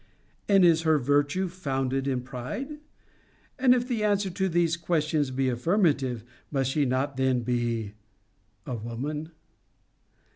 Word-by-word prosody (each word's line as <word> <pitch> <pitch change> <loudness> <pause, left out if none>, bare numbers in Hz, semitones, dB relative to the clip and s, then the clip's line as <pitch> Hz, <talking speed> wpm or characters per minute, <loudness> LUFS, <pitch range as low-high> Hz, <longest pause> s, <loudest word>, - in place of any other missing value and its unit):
And 195 -2 +6
is 165 -2 +5
her 160 -1 +3
virtue 145 +7 +1
founded 135 -6 -2
in 130 -2 0
pride? 205 - -6 0.8
And, 255 -1 +6
if 245 0 -1
the 235 -4 -1
answer 200 -2 +1
to 190 +1 -1
these 170 -1 +2
questions 155 -4 0
be 130 0 0
affirmative, 130 - +1 0.3
must 135 -2 0
she 145 0 +1
not 130 +2 -1
then 130 -2 +2
be 120 -3 -1 0.7
a 130 - -4
woman?' 130 +7 -4
145 Hz, 135 wpm, -27 LUFS, 130-175 Hz, 0.8 s, And